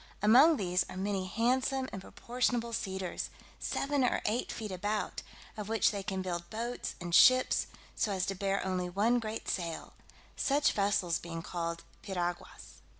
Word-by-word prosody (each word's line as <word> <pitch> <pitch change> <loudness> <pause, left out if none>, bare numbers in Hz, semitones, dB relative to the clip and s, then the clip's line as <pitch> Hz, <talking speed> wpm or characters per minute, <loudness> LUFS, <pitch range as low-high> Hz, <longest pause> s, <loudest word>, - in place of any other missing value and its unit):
Among 270 +9 +7
these 180 -3 +1
are - - -7
many 190 -1 -1
handsome 260 +5 +1
and 190 - -5
proportionable 240 +2 -1
cedars, 190 -4 -3 0.3
seven 280 -1 0
or 250 - +1
eight 230 +4 0
feet 215 -3 -5
about, 205 +3 -2 0.3
of 210 -1 -6
which 225 0 +3
they 200 -2 -3
can 190 -1 -3
build 175 -2 -4
boats 235 +3 -4
and 175 -1 -5
ships, 255 +7 +6 0.3
so 210 - 0
as 190 -2 0
to 195 - -2
bear 195 +1 -1
only 185 -1 -1
one 220 +7 +2
great 220 -1 -5
sail; 170 -3 -3 0.4
such 285 +1 +2
vessels 200 -4 +1
being 165 -1 -6
called 170 -1 -4 0.2
piraguas. 175 -3 -5
200 Hz, 155 wpm, -32 LUFS, 185-235 Hz, 0.4 s, Among